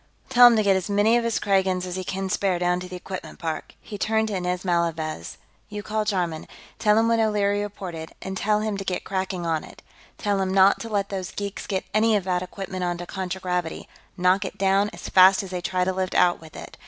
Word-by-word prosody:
"Well, - - -31
tell 245 0 +10
him 240 - +5
to 215 - +2
get 195 -1 +4
as 190 +1 -2
many 205 +3 +3
of 240 - +2
his 230 -1 0
Kragans 190 -2 +1
as 180 -1 -5
he 185 - -3
can 190 +1 -3
spare 190 -2 0
down 180 0 +1
to 180 - -7
the 185 - -7
equipment 185 +1 -7
park." 160 -2 -5
He 205 - -9
turned 220 +1 +1
to 205 - -2
Inez 180 0 -2
Malavez. 165 - -1 0.3
"You 210 -1 -6
call 215 0 -1
Jarman; 175 -6 -2 0.3
tell 210 -1 +4
him 225 +1 +3
what 230 0 +2
O'Leary 205 -2 +1
reported, 180 -6 -6
and 190 - -5
tell 210 +2 +1
him 215 -2 -2
to 195 - -4
get 185 -2 -3
cracking 190 -2 -3
on 160 -2 0
it. - - -14 0.3
Tell 200 -2 0
him 190 0 -1
not 195 +1 +5
to 230 - -6
let 200 -2 -1
those 190 -2 -4
geeks 200 -1 -5
get 190 -2 -2
any 220 +1 +3
of 200 - +1
that 180 -1 0
equipment 185 0 -5
onto 175 0 -2
contragravity; 180 -2 -3 0.3
knock 185 +2 +3
it 190 +1 -6
down 195 +1 +2
as - - -9
fast 190 +2 +6
as 190 - -8
they 180 -1 -3
try 180 +1 0
to 190 +1 0
lift 185 0 -2
out 175 -2 +3
with 160 -1 -14
it. - - -10
190 Hz, 240 wpm, -24 LUFS, 180-205 Hz, 0.3 s, tell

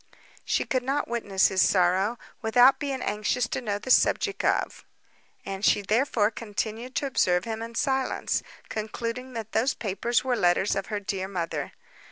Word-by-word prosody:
She - - 0
could 255 - 0
not 275 +3 -1
witness 205 -5 +1
his 190 -1 +2
sorrow, 190 +5 +3 0.2
without 245 +4 +5
being 275 -3 -3
anxious 215 +3 0
to - - -2
know 205 -4 -2
the 255 +5 -4
subject 400 +8 +3
of; - - 0 0.6
and 195 0 -5
she 205 - +3
therefore 220 0 +2
continued 225 +3 -5
to - - 0
observe 180 -9 +1
him 225 -1 -4
in 230 0 -7
silence, 265 +1 0 0.3
concluding 230 +4 -4
that 225 -2 -6
those 240 +5 +1
papers 230 +3 -1
were 255 -1 +1
letters 190 -1 +2
of 195 0 -3
her 210 -2 -2
late 190 -1 -2
mother. 165 -6 -4
220 Hz, 165 wpm, -26 LUFS, 200-250 Hz, 0.6 s, without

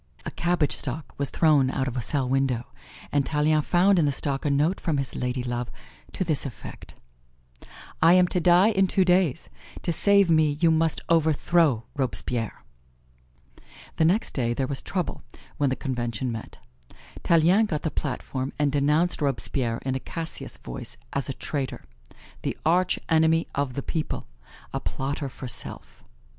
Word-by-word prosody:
A - - -4
cabbage 175 -4 0
stalk 140 +3 -4
was 140 - 0
thrown 150 -5 +3
out 130 0 -1
of 125 - -4
a 125 - -1
cell 135 +2 -1
window, 130 -2 0 0.5
and 145 -1 +2
Tallien 150 +1 +2
found 180 +4 +3
in 160 - +3
the 145 - +2
stalk 140 0 -2
a - - +2
note 150 +6 +1
from 160 -5 -1
his 135 -1 -3
ladylove 125 -1 -2 0.5
to - - -1
this 155 -5 +2
effect: 135 -5 -9 1.1
"I 165 +2 +7
am 180 -1 +5
to 180 - 0
die 180 +4 +5
in 195 -3 +3
two 190 0 +2
days; 180 -4 +2 0.4
to 175 - 0
save 200 +3 +4
me 155 -3 +3
you 165 -1 +4
must 160 0 +1
overthrow 160 -4 +3
Robespierre." 125 - -2 1.3
The 160 - +3
next 190 +8 +1
day 120 -3 0
there 135 - 0
was 135 0 -3
trouble 180 -3 -3 0.4
when 145 -3 +2
the 130 - 0
Convention 125 -3 -3
met. 115 -1 -7 0.7
Tallien 175 +6 +4
got 150 -6 -3
the 160 - -1
platform 130 -1 -3
and 145 -1 +1
denounced 150 +5 +2
Robespierre 125 -3 -1
in 130 - 0
a 130 - -2
Cassius 165 +4 -6
voice - - -6 0.2
as 140 0 -2
a - - -2
traitor 130 +2 -4 0.6
the - - -3
arch 180 +3 +3
enemy 160 0 +3
of 140 -2 -1
the 140 - -3
people 160 -2 -3 0.5
a - - -1
plotter 140 +1 -3
for 130 0 -8
self. 120 - -5
145 Hz, 165 wpm, -25 LUFS, 130-165 Hz, 1.3 s, I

